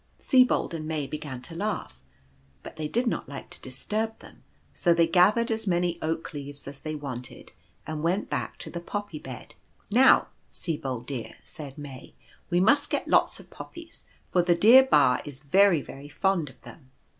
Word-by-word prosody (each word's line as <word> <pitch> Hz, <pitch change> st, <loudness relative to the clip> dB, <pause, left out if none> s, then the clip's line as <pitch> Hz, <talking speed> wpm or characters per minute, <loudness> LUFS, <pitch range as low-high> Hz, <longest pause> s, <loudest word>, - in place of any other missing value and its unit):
Sibold 255 Hz, -, +3 dB
and 155 Hz, -2 st, -5 dB
May 155 Hz, -2 st, -2 dB
began 140 Hz, -3 st, -6 dB
to 165 Hz, -, -8 dB
laugh, 170 Hz, -, -4 dB, 0.6 s
but -, -, -9 dB
they 155 Hz, -1 st, -3 dB
did 240 Hz, +10 st, 0 dB
not 230 Hz, -, -2 dB
like 140 Hz, -, -8 dB
to -, -, -8 dB
disturb 210 Hz, -, -2 dB
them, -, -, -16 dB, 0.3 s
so 170 Hz, -2 st, +2 dB
they 170 Hz, 0 st, +5 dB
gathered 210 Hz, +8 st, +4 dB
as 220 Hz, -1 st, -2 dB
many 175 Hz, -1 st, +1 dB
oak 160 Hz, +1 st, -3 dB
leaves 145 Hz, -1 st, -7 dB
as 140 Hz, 0 st, -8 dB
they 155 Hz, 0 st, -5 dB
wanted, 130 Hz, -4 st, -7 dB, 0.3 s
and 155 Hz, -1 st, -4 dB
went 175 Hz, +5 st, 0 dB
back -, -, -3 dB
to -, -, -6 dB
the 170 Hz, -, -4 dB
Poppy 190 Hz, -2 st, -5 dB
bed. 130 Hz, -3 st, -10 dB, 0.2 s
" -, -, -35 dB
Now, 255 Hz, +5 st, +6 dB, 0.2 s
Sibold, 135 Hz, -8 st, -4 dB
dear," 130 Hz, -4 st, -6 dB
said 145 Hz, -3 st, -9 dB
May, 140 Hz, -3 st, -10 dB, 0.2 s
" -, -, -30 dB
we 175 Hz, -1 st, +2 dB
must 280 Hz, +10 st, +4 dB
get -, -, -2 dB
lots -, -, +3 dB
of -, -, -16 dB
Poppies, 335 Hz, -1 st, -11 dB, 0.3 s
for 180 Hz, -, +4 dB
the 175 Hz, 0 st, +3 dB
dear 225 Hz, +9 st, +8 dB
Ba 140 Hz, -, +4 dB
is 145 Hz, -2 st, -10 dB
very 180 Hz, +1 st, +4 dB
very 140 Hz, +2 st, -10 dB
fond 175 Hz, -2 st, 0 dB
of -, -, -18 dB
them." 130 Hz, -5 st, -14 dB
160 Hz, 190 wpm, -27 LUFS, 140-200 Hz, 0.6 s, dear